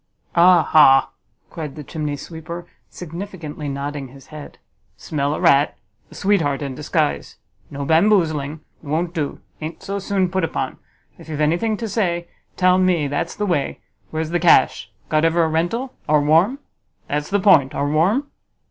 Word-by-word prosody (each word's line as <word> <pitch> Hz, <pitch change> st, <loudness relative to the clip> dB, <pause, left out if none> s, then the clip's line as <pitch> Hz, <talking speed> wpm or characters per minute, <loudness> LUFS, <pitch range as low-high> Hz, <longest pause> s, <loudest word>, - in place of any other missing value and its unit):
"Ah 175 Hz, -1 st, +6 dB
ha!" 135 Hz, -4 st, +5 dB, 0.4 s
cried 155 Hz, -4 st, -6 dB
the 150 Hz, -, -8 dB
chimney 150 Hz, 0 st, -4 dB
sweeper, 170 Hz, +3 st, -8 dB, 0.2 s
significantly 170 Hz, -4 st, -7 dB
nodding 140 Hz, 0 st, -4 dB
his 135 Hz, +2 st, -15 dB
head, 150 Hz, -1 st, -10 dB, 0.4 s
"smell 145 Hz, -1 st, -2 dB
a -, -, -5 dB
rat! 150 Hz, -5 st, +3 dB, 0.3 s
a -, -, -15 dB
sweetheart 165 Hz, -9 st, +1 dB
in 140 Hz, -2 st, -4 dB
disguise. 150 Hz, +2 st, -2 dB, 0.3 s
No 140 Hz, 0 st, -5 dB
bamboozling! 160 Hz, -4 st, +2 dB, 0.2 s
it 150 Hz, -, -14 dB
won't 165 Hz, +4 st, -1 dB
do; 155 Hz, -5 st, -3 dB, 0.2 s
a'n't 160 Hz, +1 st, -7 dB
so 200 Hz, +1 st, -3 dB
soon 195 Hz, -1 st, 0 dB
put 190 Hz, -1 st, 0 dB
upon. 165 Hz, -, -3 dB, 0.4 s
If -, -, -13 dB
you've 155 Hz, -, -4 dB
got 150 Hz, -, +1 dB
any 155 Hz, +3 st, +2 dB
thing 220 Hz, -2 st, -1 dB
to 230 Hz, -, -4 dB
say, 175 Hz, -5 st, -1 dB, 0.3 s
tell 185 Hz, 0 st, +4 dB
me, 180 Hz, -5 st, +2 dB
that's 145 Hz, +4 st, -3 dB
the 210 Hz, -, -2 dB
way. 170 Hz, -8 st, -1 dB, 0.3 s
Where's 160 Hz, 0 st, -3 dB
the 175 Hz, -, +1 dB
cash? 165 Hz, -6 st, +4 dB, 0.2 s
Got 155 Hz, 0 st, +1 dB
ever 165 Hz, +1 st, +3 dB
a -, -, +2 dB
rental? 175 Hz, +12 st, -1 dB, 0.2 s
Are 150 Hz, 0 st, +5 dB
warm? 165 Hz, -, +3 dB, 0.5 s
That's 150 Hz, +1 st, -2 dB
the 205 Hz, +1 st, +1 dB
point; 160 Hz, -9 st, +4 dB
are 145 Hz, -, 0 dB
warm?" 195 Hz, -, +1 dB
160 Hz, 170 wpm, -21 LUFS, 150-185 Hz, 0.5 s, Ah